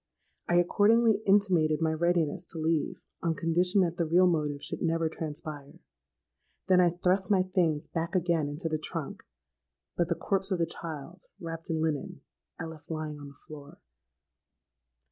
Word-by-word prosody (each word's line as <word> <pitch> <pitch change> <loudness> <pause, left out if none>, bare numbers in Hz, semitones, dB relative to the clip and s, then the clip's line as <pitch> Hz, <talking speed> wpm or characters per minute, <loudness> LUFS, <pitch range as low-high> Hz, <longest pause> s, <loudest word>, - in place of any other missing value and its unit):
I 175 - +3
accordingly 215 +5 +4
intimated 180 -6 +3
my 160 -1 +1
readiness 170 0 0
to - - -7
leave 160 -1 -1 0.2
on 165 -1 0
condition 180 +5 +2
that 175 -2 0
the 170 - 0
real 175 +3 +5
motive 150 -5 0
should - - -4
never 165 0 +1
transpire. 150 -2 -6 0.9
Then 185 -1 +5
I 175 - +5
thrust 180 +2 +1
my 190 -3 +4
things 170 -5 0
back 165 +3 -3
again 170 -4 +1
into 150 +3 -3
the 155 -1 -1
trunk: 155 -1 -5 0.7
but 175 - +1
the 170 - +1
corpse 195 +1 -1
of 190 - 0
the 170 - +1
child, 165 +2 -7
wrapped 165 0 -7
in 160 -1 0
linen, 155 -4 -3 0.4
I - - -3
left 160 -2 -11
lying 155 -2 -4
on 145 - -9
the 140 - -13
floor. 145 +1 -12
165 Hz, 165 wpm, -29 LUFS, 155-180 Hz, 0.9 s, real